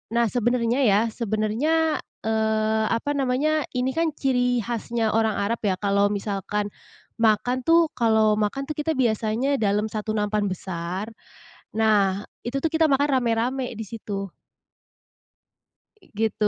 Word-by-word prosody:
Nah 235 0 +4
sebenarnya 240 +1 +1
ya, 205 0 +5
sebenarnya, 240 +10 0 0.2
eee, 220 0 +1
apa 230 +6 -1
namanya 285 +2 0
ini 250 +1 0
kan 325 +1 -1
ciri 245 -4 +1
khasnya 230 -1 -1
orang 220 -1 +1
Arab 215 +3 -1
ya, 200 -3 0
kalau 200 +1 +2
misalkan 205 0 -2 0.5
makan 225 +3 +2
tuh 330 -1 +5
kalau 220 -2 +2
makan 215 +6 -1
tuh 305 - -3
kita 310 +1 0
biasanya 235 +3 +1
dalam 210 +1 0
satu 215 0 -3
nampan 210 -1 0
besar. 185 +2 -4 0.6
Nah 205 -3 +2 0.2
itu 250 +3 -2
tuh 325 - +1
kita 320 0 +3
makan 285 0 +2
rame-rame 245 +2 -1
di 225 - -5
situ. 200 -3 -6 1.8
Gitu. 215 0 0
225 Hz, 130 wpm, -24 LUFS, 210-255 Hz, 1.8 s, ya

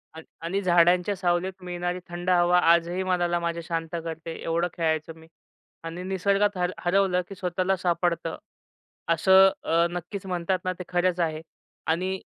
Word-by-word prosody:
अन् 160 - -9 0.2
आणि 195 +4 -1
झाडांच्या 180 +2 +3
सावलीत 180 0 0
मिळणारी 175 0 -3
थंड 175 +1 -4
हवा 175 0 +4
आजही 170 +2 +1
मनाला 175 -2 +1
माझ्या 170 0 -2
शांत 165 0 -3
करते, 165 0 -6
एवढं 170 +1 0
खेळायचो 160 -1 -1
मी 160 - -16 0.6
आणि 165 +2 -6
निसर्गात 195 +2 +1
हर 180 0 0
हरवलं, 185 0 +2
की 195 - -9
स्वतःला 185 0 0
सापडतं 175 -2 -1 0.8
असं, 190 +3 +6
अ, 165 +1 +2
नक्कीच 180 +3 -6
म्हणतात 180 0 -1
ना, 185 - 0
ते - - -4
खरंच 180 0 +1
आहे 160 -2 -1 0.5
आणि 185 +4 0
175 Hz, 150 wpm, -26 LUFS, 170-185 Hz, 0.8 s, असं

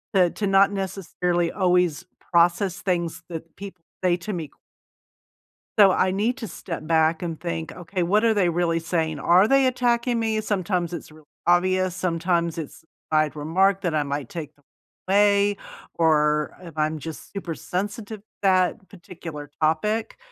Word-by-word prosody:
to 180 -2 +5
to 205 - -2
not 195 +1 +5
necessarily 180 -3 -1
always 180 -5 +1 0.3
process 175 +2 +2
things 170 -3 -1
that 165 -1 -8
people 190 -3 -10 0.2
say 175 -1 +3
to 200 +4 -5
me 165 -3 -4 1.3
so 200 -2 +8
I 185 0 +2
need 225 +7 0
to 225 - -6
step 165 -5 -7
back 160 0 +2
and 165 -3 -4
think, 170 -2 -4
"Okay, 180 +1 -3
what 210 +5 +2
are 225 - +4
they 185 -4 +2
really 170 -1 +1
saying? 160 -2 -1
Are 180 +7 +5
they 270 +2 +4
attacking 240 -1 +1
me?" 220 -1 0
Sometimes 185 -4 -1
it's 160 - -7
really 155 -1 -17 0.2
obvious, 185 +1 +2
sometimes 170 -2 0
it's 160 0 -7 0.3
I'd 155 -1 +2
remark 185 +6 +2
that 175 -4 -1
I 150 - +2
might 140 -2 -4
take 155 -3 -7
them 145 - -31 0.4
away, 200 +1 +3 0.4
or 150 -2 +2
if 165 -3 -12
I'm 155 0 0
just 160 +1 -8
super 180 -5 -5
sensitive 205 +3 -4
to - - -46 0.2
that 185 +1 +2
particular 165 -5 -9
topic, 210 +9 0
180 Hz, 160 wpm, -24 LUFS, 165-195 Hz, 1.3 s, so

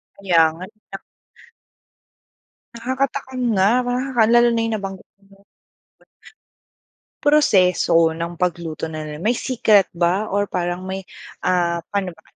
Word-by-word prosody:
Kaya 185 -4 +2
nga 180 +3 -9
ilak 195 -2 -11 1.7
Nakaka-takam 260 +2 -3
nga, 190 -2 +3 0.2
nakaka 245 -1 0
lalo 240 0 +5
na 230 -1 0
nabanggit 195 -3 -6 0.2
mo. 195 0 -21 1.8
Proseso 180 - +3
ng 170 +1 -5
pagluto 170 -3 -3
na 155 -1 -6 0.2
may 215 +9 0
secret 220 -6 +2
ba, 175 +5 0
or 205 +1 0
parang 175 -1 -3
may, 190 +1 -4 0.4
ah, 175 -2 0
pano 195 -3 -2
ba, 160 - -23
195 Hz, 110 wpm, -20 LUFS, 175-230 Hz, 1.8 s, lalo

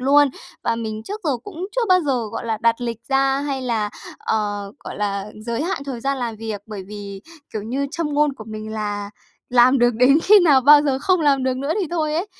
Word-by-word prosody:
luôn. 285 +2 +5 0.4
Và 230 - +1
mình 220 -1 -4
trước 415 - -6
giờ 300 - +1
cũng 370 -2 -6
chưa - - +2
bao 365 0 +5
giờ, 260 -7 -1
gọi 230 - -5
là, 220 -2 -1
đặt 230 +1 +2
lịch 235 -2 -3
ra 270 0 +2
hay 275 -2 -3
là, 220 -4 -1 0.3
ờ, 205 -2 -2
gọi - - -7
là, 200 -1 -2 0.2
giới 235 +5 -1
hạn 350 -4 -2
thời 260 -4 -5
gian 275 +2 -1
làm 235 -3 -3
việc, 220 -2 -5
bởi 210 -3 -7
vì, 200 -2 -8 0.3
kiểu 215 - -3
như, 265 +6 -2
châm 310 -3 -3
ngôn 295 0 +3
của 240 -5 -11
mình 215 0 -7
là 205 -1 -3 0.4
làm 250 +2 +5
được 240 0 +3
đến 255 +6 +5
khi 410 +1 +7
nào 290 -6 +5
bao 290 +3 +7
giờ 275 -3 0
không 365 +5 +2
làm 280 -3 +3
được 260 -1 0
nữa 280 +4 -1
thì 360 - -1
thôi 310 -3 -1
ấy, 340 +6 -1
255 Hz, 230 wpm, -21 LUFS, 220-290 Hz, 0.4 s, khi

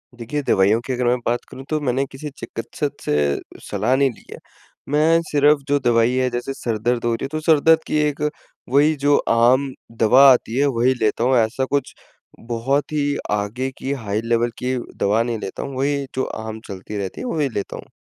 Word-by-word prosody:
देखिए, 120 +5 -4
दवाइयों 100 +4 +4
की 130 - -4
अगर 125 0 -1
मैं 120 +1 +3
बात 120 +1 +1
करूँ 130 - -9
तो 155 - 0
मैंने 135 0 0
किसी 135 +3 -8
चिकित्सक 115 +5 -4
से 75 -1 +1 0.3
सलाह 105 +6 +1
नहीं 135 0 +3
ली - - -18
है। - - -8 0.5
मैं 155 +3 +3
सिर्फ़ 145 0 +4
जो 145 0 +2
दवाई 115 0 +3
है 130 0 +1
जैसे 120 +2 -4
सर 115 -4 -3
दर्द 120 +2 -1
हो 120 - +2
रही 115 - -4
है - - -1
तो 155 - -2
सर 155 -1 +4
दर्द 160 +2 +4
की - - 0
एक 150 -1 -1 0.5
वही 145 +4 +4
जो 145 0 +5
आम 125 +4 +4 0.3
दवा 120 +4 +6
आती 120 -1 +1
है 140 - +3
वही 125 +3 +3
लेता 110 +1 +1
हूँ। 130 +1 +3
ऐसा 115 +4 +1
कुछ 140 +1 -2 0.5
बहुत 120 +6 -1
ही 145 -1 0
आगे 105 +6 -1
की 135 - -4
हाई 105 +1 -1
लेवल 115 +1 +1
की 130 +1 0 0.2
दवा 105 +3 +2
नहीं 120 -1 -2
लेता 95 - -5
हूँ। 135 -2 -6
वही 140 +1 0
जो 130 - 0
आम 110 0 -6
चलती 100 +2 -7
रहती 95 -2 -5
है - - -5
वही 150 - 0
लेता 100 -4 -4
हूँ। - - -11
125 Hz, 210 wpm, -21 LUFS, 115-140 Hz, 0.5 s, दवा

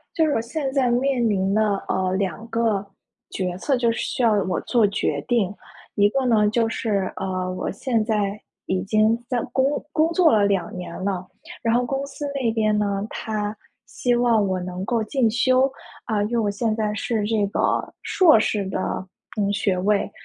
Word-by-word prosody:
就 320 - +3
是 300 - +1
我 225 - +1
现 270 +3 -3
在 265 -3 +2
面 245 0 +1
临 195 -2 +1
的， 215 - +3 0.3
呃， 185 0 0
两 195 +2 -2
个 225 -3 0 0.4
决 180 -2 -3
策 265 +6 0
就 235 -1 +2
是 230 - -3
需 - - -2
要 225 -2 +5
我 185 -1 -1
做 235 -4 +2
决 200 - -1
定， 225 -6 +1 0.4
一 205 0 +4
个 265 +4 0
呢 215 -4 +4
就 230 +1 +1
是， 205 -4 -1
呃， 185 -1 -3
我 185 - -3
现 230 +2 0
在 210 -2 -1 0.3
已 185 0 -1
经 215 +3 +2
在 245 -2 0
工 265 - +3 0.3
工 320 +1 +2
作 335 -2 +4
了 210 -2 +4
2 200 -1 0
年 180 -1 -6
了， 190 -2 -2 0.4
然 230 - +1
后 245 +1 +2
公 270 +2 -2
司 290 +1 -7
那 250 -5 +1
边 215 -1 +1
呢， 200 0 -1
它 210 -1 -3 0.3
希 245 +2 -1
望 235 -3 +3
我 185 -1 -1
能 180 +1 -5
够 230 +3 0
进 235 0 +1
修， 255 +3 +3 0.3
啊， 215 -3 0
因 210 - -2
为 240 - +1
我 210 -2 +1
现 215 +2 -1
在 215 -1 -1
是 220 0 -1
这 210 -2 +1
个 195 - -4 0.4
硕 345 - +5
士 210 -2 0
的， 190 - -3 0.6
嗯， 200 -1 +1
学 200 -2 0
位。 200 +2 +1
215 Hz, 205 characters per minute, -23 LUFS, 200-240 Hz, 0.6 s, 要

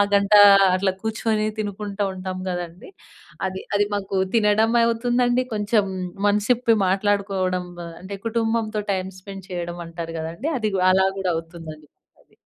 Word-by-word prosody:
గంట 200 +1 +2 0.4
అట్లా 190 0 +1
కూర్చొని 220 -1 0
తినుకుంటూ 205 0 -3
ఉంటాం 185 0 -5
కదండీ. 175 - -6 0.6
అది, 190 0 -6
అది 205 0 +2
మాకు 195 -1 -3 0.2
తినడం 220 +1 +3
అవుతుందండి 245 +2 +1
కొంచెం 210 0 +1 0.4
మనసిప్పి 225 +3 +2
మాట్లాడుకోవడం, 190 -2 0
మ - - -7 0.2
అంటే 195 +2 -6
కుటుంబంతో 225 -1 -1
టైమ్ 190 0 -3
స్పెండ్ 195 -1 -10
చేయడం 175 -1 -4
అంటారు 165 0 -7
కదండీ. 170 - -4
అది, 215 -2 -1 0.2
అలా 190 +1 +4
కూడా 185 -2 -1
అవుతుందండి 165 -2 -9 0.3
అది. - - -31
200 Hz, 130 wpm, -22 LUFS, 185-215 Hz, 0.6 s, అలా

